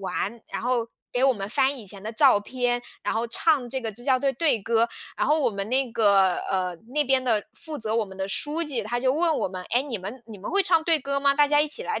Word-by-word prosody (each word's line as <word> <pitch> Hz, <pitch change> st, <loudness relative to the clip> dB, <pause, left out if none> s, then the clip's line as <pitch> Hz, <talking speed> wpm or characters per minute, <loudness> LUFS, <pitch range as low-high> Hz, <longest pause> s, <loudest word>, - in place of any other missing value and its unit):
玩， 195 Hz, +4 st, -3 dB
然 -, -, -3 dB
后 240 Hz, -1 st, 0 dB, 0.3 s
给 245 Hz, -, 0 dB
我 270 Hz, -, +5 dB
们 195 Hz, -1 st, -5 dB
翻 265 Hz, +4 st, +1 dB
以 215 Hz, -, -11 dB
前 195 Hz, 0 st, -5 dB
的 220 Hz, -, -4 dB
照 215 Hz, -, +5 dB
片， 245 Hz, +2 st, -1 dB, 0.2 s
然 -, -, -1 dB
后 230 Hz, +1 st, -1 dB
唱 265 Hz, +1 st, +1 dB
这 265 Hz, +2 st, -3 dB
个 225 Hz, -, -2 dB
支 240 Hz, -, -10 dB
教 260 Hz, -1 st, +3 dB
队 275 Hz, +1 st, +1 dB
队 280 Hz, -3 st, +2 dB
歌， 230 Hz, +2 st, +2 dB, 0.3 s
然 -, -, 0 dB
后 305 Hz, +2 st, +3 dB
我 260 Hz, -5 st, +2 dB
们 200 Hz, -1 st, -4 dB
那 260 Hz, -1 st, +1 dB
个， 195 Hz, -5 st, +4 dB
呃， 185 Hz, -2 st, -1 dB, 0.2 s
那 300 Hz, -1 st, +2 dB
边 265 Hz, -1 st, +2 dB
的 225 Hz, -5 st, +1 dB
负 315 Hz, -2 st, -7 dB
责 220 Hz, -1 st, -2 dB
我 230 Hz, -, +2 dB
们 190 Hz, -1 st, -12 dB
的 190 Hz, 0 st, -2 dB
书 300 Hz, +11 st, 0 dB
记， 270 Hz, -8 st, -2 dB
他 240 Hz, +4 st, -2 dB
就 260 Hz, +1 st, +2 dB
问 320 Hz, +1 st, +1 dB
我 -, -, 0 dB
们： 185 Hz, -1 st, -6 dB
“哎， 245 Hz, +3 st, +3 dB
你 250 Hz, -8 st, -4 dB
们 215 Hz, +7 st, -8 dB
你 215 Hz, -3 st, -10 dB
们 200 Hz, -, -6 dB
会 400 Hz, 0 st, +3 dB
唱 335 Hz, -3 st, +3 dB
队 330 Hz, -2 st, +4 dB
歌 280 Hz, 0 st, -2 dB
吗？ 280 Hz, 0 st, +3 dB
大 295 Hz, 0 st, +4 dB
家 295 Hz, 0 st, +3 dB
一 300 Hz, -, +1 dB
起 455 Hz, +11 st, -2 dB
来 445 Hz, -, -3 dB
245 Hz, 295 characters per minute, -25 LUFS, 210-280 Hz, 0.3 s, 我